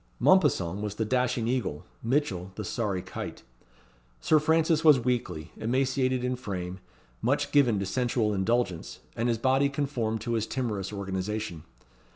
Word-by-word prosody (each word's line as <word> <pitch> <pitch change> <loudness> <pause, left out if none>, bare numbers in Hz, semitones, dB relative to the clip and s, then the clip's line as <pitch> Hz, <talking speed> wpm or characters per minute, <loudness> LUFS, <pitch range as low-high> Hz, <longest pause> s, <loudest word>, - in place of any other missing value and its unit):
Mompesson 105 - +3
was 105 -1 -3
the 110 - -1
dashing 125 -1 +1
eagle; 115 - -2 0.2
Mitchell 115 -8 -1
the 105 - -5
sorry 100 -4 -2
kite. 95 - -7 0.8
Sir 155 - +4
Francis 160 +1 +2
was 150 -4 +7
weakly, 115 -10 -2
emaciated 130 +2 +1
in 125 0 0
frame; 95 -6 -5 0.4
much - - +1
given 130 -7 +4
to 100 - -1
sensual 115 0 0
indulgence; 95 -3 -1
and 120 +2 0
his 115 - +1
body 135 +4 +3
conformed 130 -6 -1
to 120 +1 -2
his 110 -1 0
timorous 105 -7 -2
organization. 95 -3 -4
115 Hz, 145 wpm, -28 LUFS, 100-130 Hz, 0.8 s, was